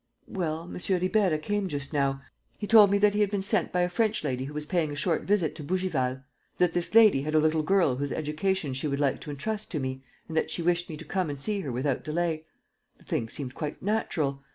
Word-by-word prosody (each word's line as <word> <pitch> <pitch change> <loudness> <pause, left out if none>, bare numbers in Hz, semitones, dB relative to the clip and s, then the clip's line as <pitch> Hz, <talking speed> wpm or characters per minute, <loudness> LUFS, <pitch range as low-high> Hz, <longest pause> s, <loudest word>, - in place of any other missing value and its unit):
"Well, 165 -4 -3
M. 175 - -8 0.2
Ribeira 185 -2 +2
came 205 +5 -2
just 145 -2 -5
now. 135 -1 0 0.3
He 210 - -4
told 210 -1 +7
me 200 - +3
that 205 0 +4
he 210 - 0
had 205 - +3
been 200 -1 -2
sent 200 -2 +1
by 180 - +1
a 175 - +3
French 215 +2 0
lady 130 -3 -2
who 145 - -7
was 150 0 -3
paying 160 -2 0
a - - -5
short 160 +3 0
visit 190 -6 +2
to 155 - -7
Bougival, 140 -7 -1 0.3
that 180 -2 +2
this 175 +4 -1
lady 215 -11 +7
had 155 +2 -2
a - - +6
little 155 +1 +2
girl 170 -6 +2
whose 140 +1 -2
education 155 0 -1
she 130 +4 -2
would 140 -1 -2
like 140 -2 +1
to - - -8
entrust 210 +10 -4
to 155 - -2
me 130 0 -4 0.2
and 160 - -7
that 160 - +1
she 170 - -2
wished 175 +1 +1
me 155 - -6
to 165 - -9
come 185 +1 -1
and 140 -1 -5
see 205 +8 -1
her 145 -9 -4
without 130 +2 -1
delay. 160 0 -1 0.5
The - - -21
thing 115 - -2
seemed 130 -1 -5
quite 150 +1 -5
natural. 155 -10 -1
160 Hz, 245 wpm, -28 LUFS, 145-190 Hz, 0.5 s, told